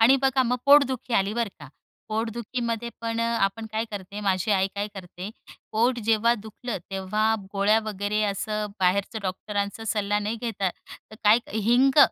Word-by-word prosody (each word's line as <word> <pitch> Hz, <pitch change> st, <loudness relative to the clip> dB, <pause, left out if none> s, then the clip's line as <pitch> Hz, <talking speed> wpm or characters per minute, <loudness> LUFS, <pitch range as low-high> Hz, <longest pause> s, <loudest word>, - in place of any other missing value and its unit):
आणि 245 Hz, +4 st, +7 dB
बघा 265 Hz, -1 st, +3 dB
मग 250 Hz, 0 st, +1 dB
पोटदुखी 265 Hz, -4 st, +5 dB
आली 195 Hz, +2 st, +2 dB
बर 235 Hz, -2 st, 0 dB
का, 145 Hz, -3 st, -11 dB, 0.4 s
पोटदुखीमध्ये 230 Hz, +1 st, -2 dB
पण 230 Hz, 0 st, -2 dB
अ, 230 Hz, -, +2 dB, 0.2 s
आपण 195 Hz, +3 st, 0 dB
काय 220 Hz, +1 st, 0 dB
करते, 200 Hz, 0 st, -6 dB
माझी 195 Hz, 0 st, 0 dB
आई 190 Hz, -1 st, +3 dB
काय 205 Hz, +1 st, -2 dB
करते 185 Hz, 0 st, -7 dB, 0.4 s
पोट 240 Hz, +3 st, +2 dB
जेव्हा 225 Hz, +1 st, +4 dB
दुखलं, 220 Hz, +1 st, -6 dB
तेव्हा 210 Hz, +3 st, +1 dB, 0.2 s
गोळ्या 205 Hz, +2 st, +4 dB
वगैरे 210 Hz, 0 st, -1 dB
असं 210 Hz, +1 st, -1 dB
बाहेरचं 195 Hz, +4 st, +1 dB
डॉक्टरांचा 200 Hz, +3 st, -3 dB
सल्ला 205 Hz, -1 st, +1 dB
नाही 210 Hz, +2 st, -2 dB
घेता, 210 Hz, -5 st, -1 dB, 0.4 s
तर -, -, -10 dB
काय 215 Hz, +3 st, +7 dB, 0.2 s
हिंग, 245 Hz, +6 st, +3 dB
215 Hz, 160 wpm, -26 LUFS, 200-230 Hz, 0.4 s, आणि